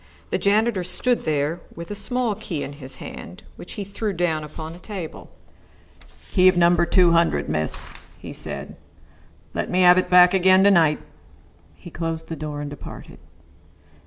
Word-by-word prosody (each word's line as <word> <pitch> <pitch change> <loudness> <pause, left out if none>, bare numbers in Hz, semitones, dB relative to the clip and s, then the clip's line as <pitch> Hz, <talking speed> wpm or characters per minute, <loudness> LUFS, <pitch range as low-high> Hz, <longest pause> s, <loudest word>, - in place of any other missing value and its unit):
The - - 0
janitor 210 -1 +2
stood 245 +7 -1
there 155 +3 -1
with 170 +3 -8
a - - -2
small 225 +3 -1
key 195 -7 -5
in 140 - -7
his 135 -2 -8
hand, 90 - -10
which - - -10
he 205 - -5
threw 200 +1 -4
down 165 -3 -1
upon 155 +1 -8
a 175 - -12
table. 185 -4 -8 1.0
"Key 185 -2 +5
of 185 -1 +5
number 175 0 +4
two 180 -3 +4
hundred, 170 0 +2
miss," 75 0 -3 0.2
he - - -9
said. - - -6 0.8
"Let - - -3
me 185 - +2
have 180 0 +7
it - - -2
back 180 0 +7
again 190 0 +5
to 200 - +6
night." 160 -5 +3 0.7
He 175 - -13
closed 165 -1 -4
the 165 - -4
door 150 -1 -5
and 145 - -5
departed. 145 - -10
175 Hz, 170 wpm, -23 LUFS, 160-195 Hz, 1.0 s, have